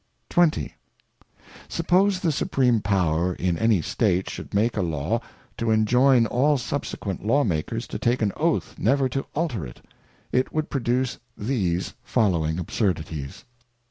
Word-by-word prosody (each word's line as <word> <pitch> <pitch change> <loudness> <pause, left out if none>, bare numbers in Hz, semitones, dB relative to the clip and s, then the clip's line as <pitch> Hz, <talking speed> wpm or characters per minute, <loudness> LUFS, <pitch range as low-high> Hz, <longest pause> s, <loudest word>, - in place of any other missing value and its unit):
XX. 175 -3 +2 1.0
Suppose 185 +3 +2
the 165 - +2
Supreme 125 -4 +2
Power 90 -3 +1
in 90 -1 0
any 110 -7 +3
State 95 -2 0
should - - -8
make 110 +4 +1
a 105 - 0
Law, 85 +7 -1 0.4
to 115 - -1
enjoyn 120 +3 +4
all 140 +6 +2
subsequent 120 -8 -4
Law 140 +7 +3
makers 80 - -2
to - - -6
take 120 0 +1
an 100 - +1
Oath - - -1
never 135 +5 +2
to 135 +2 -3
alter 145 - -1
it, - - -11 0.5
it 130 +1 +1
would 155 -1 -2
produce 125 -1 0 0.2
these 95 -6 -1
following 85 -9 +1
Absurdities. 80 - -3
115 Hz, 140 wpm, -24 LUFS, 90-135 Hz, 1.0 s, enjoyn